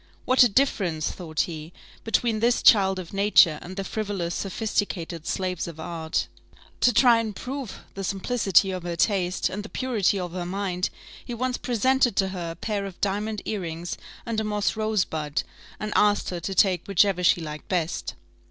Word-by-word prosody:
What 255 - +4
a 245 - +7
difference, 195 - +1
thought 160 -4 -2
he, 160 0 -5 0.3
between 225 0 +1
this 235 +2 +2
child 195 -3 +6
of 185 -1 -7
nature 195 -6 +5
and 185 +2 -8
the 195 - -3
frivolous, 195 -4 -3
sophisticated 185 -5 -2
slaves 185 -3 -2
of 165 -2 -9
art! 160 -1 -2 0.5
To 245 - +5
try 235 0 +5
and 220 -3 -3
prove 265 -1 -6
the 195 - -5
simplicity 195 0 +2
of 185 -1 -4
her 175 0 -4
taste, 185 0 +1
and 205 - -4
the 210 - -9
purity 220 -6 0
of 180 -2 -4
her 180 0 -4
mind, 185 -1 -1 0.3
he 240 - -6
once 255 +1 -2
presented 250 -1 +2
to 190 -1 +2
her 180 -3 -4
a 165 - -6
pair 200 +2 -3
of 190 - -11
diamond 210 +2 -1
earrings 175 -4 -4 0.3
and 230 -2 -1
a - - -1
moss 210 -1 0
rosebud, 180 -9 -1 0.4
and 215 0 -3
asked 205 -2 +3
her 175 - -3
to 190 +3 -4
take 185 -4 +3
whichever 195 -1 +3
she 175 - +5
liked 155 -2 -7
best. 175 -4 -2
195 Hz, 180 wpm, -25 LUFS, 175-215 Hz, 0.5 s, a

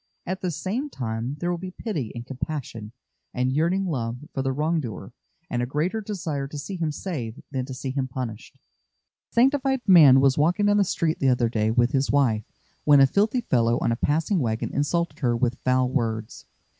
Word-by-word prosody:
At 185 +1 -4
the 185 - -1
same 195 - -3
time 120 - -4
there 175 +3 -1
will 175 - -2
be 185 +1 -6
pity 180 - -4
and 120 0 -6
compassion 130 -5 -5 0.4
and 125 +1 0
yearning 170 +6 +1
love 120 -8 -2 0.2
for 135 - -1
the 135 0 0
wrong 155 +5 0
doer 115 -10 -7 0.3
and 120 - -2
a 120 - -1
greater 165 - -1
desire 170 -10 -4
to 150 - -8
see 170 +7 -5
him 165 -4 -1
saved 140 - -5
than 130 -2 -2
to 130 - -7
see 130 +1 -4
him 135 -1 -2
punished. 125 -4 -6
A - - -45
sanctified 265 +1 +3
man 150 -8 +8
was 135 +1 +3
walking 175 +7 +2
down 205 0 +4
the 205 - +5
street 165 -3 -1
the 135 - +3
other 120 -2 +2
day 110 -2 0
with 120 +2 +2
his 135 -1 +1
wife, 120 -7 +2 0.4
when 145 -1 +6
a 135 - +8
filthy 215 - +1
fellow 120 - +2
on - - 0
a - - +1
passing 160 - +1
wagon 115 -5 -2
insulted 170 +4 -1
her 120 -4 +1
with 125 +1 0
foul 130 0 +2
words. 115 -4 -3
140 Hz, 205 wpm, -25 LUFS, 125-175 Hz, 0.4 s, man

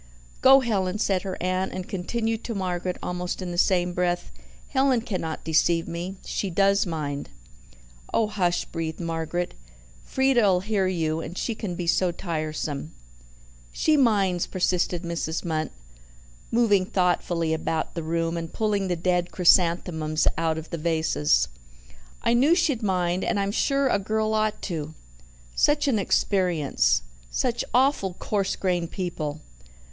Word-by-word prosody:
"Go, 270 +1 +8
Helen," 200 -5 0
said 195 -3 +1
her 190 -1 -5
aunt; 185 +1 0
and 185 -1 -5
continued 225 +4 -2
to 230 - -3
Margaret 180 -1 -2
almost 180 0 -3
in 185 -2 -4
the 175 - -5
same 180 -1 +2
breath: 175 0 -1 0.4
"Helen 265 -3 +2
cannot 185 -9 -4
deceive 165 +1 +2
me, 175 +3 -5
She 200 - -2
does 195 +2 +3
mind." 145 -4 -4 0.8
"Oh, 225 - +2
hush!" 190 -5 0
breathed 160 -1 -4
Margaret. 165 +1 -2 0.5
"Frieda'll 240 -9 +3
hear 200 -1 0
you, 160 -3 0
and 170 +3 -7
she 230 - -1
can 205 -5 -5
be 175 - -4
so 175 +1 +2
tiresome." 155 -3 -4 0.8
"She 310 - +2
minds," 200 - +2
persisted 180 -1 0
Mrs. 170 -1 -3
Munt, 155 -2 -1 0.8
moving 205 -5 +3
thoughtfully 175 -3 +1
about 160 0 -2
the 170 - -3
room, 165 +1 -1
and 165 -1 -5
pulling 205 -3 0
the 180 - 0
dead 175 +1 0
chrysanthemums 170 -3 +3
out 160 -1 0
of 160 0 -8
the 170 - -3
vases. 150 - +2 0.8
"I 235 - +3
knew 275 +8 +5
she'd 300 -9 +1
mind 180 -3 0
and - - 0
I'm 200 0 0
sure 275 +5 +2
a 220 - +2
girl 220 +2 0
ought 215 -1 0
to! 160 -4 -4 0.6
Such 295 0 +2
an 235 -6 +2
experience! 150 - +1 0.3
Such - - 0
awful 245 -7 +2
coarse 195 -1 -1
grained 175 -3 -1
people! 155 -5 -4
180 Hz, 145 wpm, -25 LUFS, 165-205 Hz, 0.8 s, Go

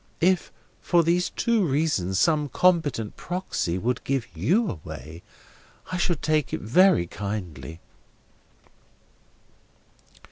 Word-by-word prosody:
If, 180 +1 +2 0.3
for 170 -1 +3
these 175 +2 +1
two 230 -3 +1
reasons, 135 - 0
some 150 -3 +2
competent 150 -10 +1
Proxy 175 - -3
would 120 +5 -2
give 135 -3 -1
you 180 - +2
away, 80 - -8 0.7
I 185 - -1
should 175 -4 -1
take 155 -2 +1
it - - -1
very 175 - +4
kindly." 85 -7 -6
145 Hz, 105 wpm, -25 LUFS, -, 0.7 s, very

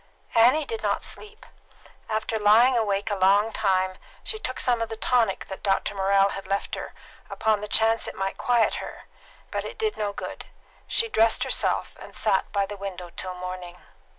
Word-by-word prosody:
Annie 250 +7 +5
did 455 +5 -4
not - - 0
sleep. 430 +1 -6 0.6
After 220 +1 -1
lying 220 +5 +5
a 230 - +3
long 200 +1 +2
time 190 -3 +2
awake 185 - -18 0.2
she 435 - -3
took 255 -11 -3
some 240 -2 +2
of 230 - -2
the 225 - -5
tonic 230 -4 +1
that 190 - -8
Dr. 195 +1 0
Morrell 195 0 +3
had 195 - -6
left 195 0 -2
her, - - -5 0.3
upon 215 -2 +1
the 210 - -4
chance 225 +1 +3
that - - -6
it - - -15
might 195 0 -2
quiet 240 -2 +2
her; - - -8 0.5
but - - -2
it - - -7
did 435 -1 -1
no 205 -1 -1
good. - - -7 0.4
She 460 - +2
dressed 225 - +3
herself, - - -1
and - - -11
sat - - +1
by 200 -1 +1
the 205 +1 -7
window 185 -3 -6
till 185 -1 -4
morning. 180 -1 -7
210 Hz, 190 wpm, -25 LUFS, 195-230 Hz, 0.6 s, Annie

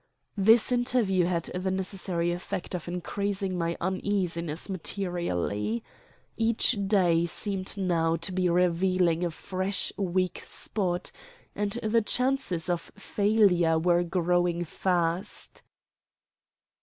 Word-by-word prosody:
This 220 +5 +5
interview 240 -7 +2
had 170 -2 0
the 185 +1 -2
necessary 185 -2 -1
effect 175 +1 -5
of 175 -3 -4
increasing 190 +2 -2
my 170 -1 -1
uneasiness 180 -4 -1
materially. 165 - -2 0.5
Each 225 +2 +3
day 175 -4 +3
seemed 195 +2 -2
now 165 -4 +1
to 165 +3 -4
be 180 -1 +1
revealing 180 0 +2
a 175 - +1
fresh 185 +4 -2
weak 185 -1 -1
spot, 180 -4 -2 0.4
and 205 -1 -1
the 225 +1 +3
chances 250 -7 +1
of 175 -2 -2
failure 200 -5 +2
were 175 +1 +3
growing 175 0 +1
fast. 175 +1 -1
180 Hz, 105 wpm, -27 LUFS, 170-200 Hz, 0.5 s, This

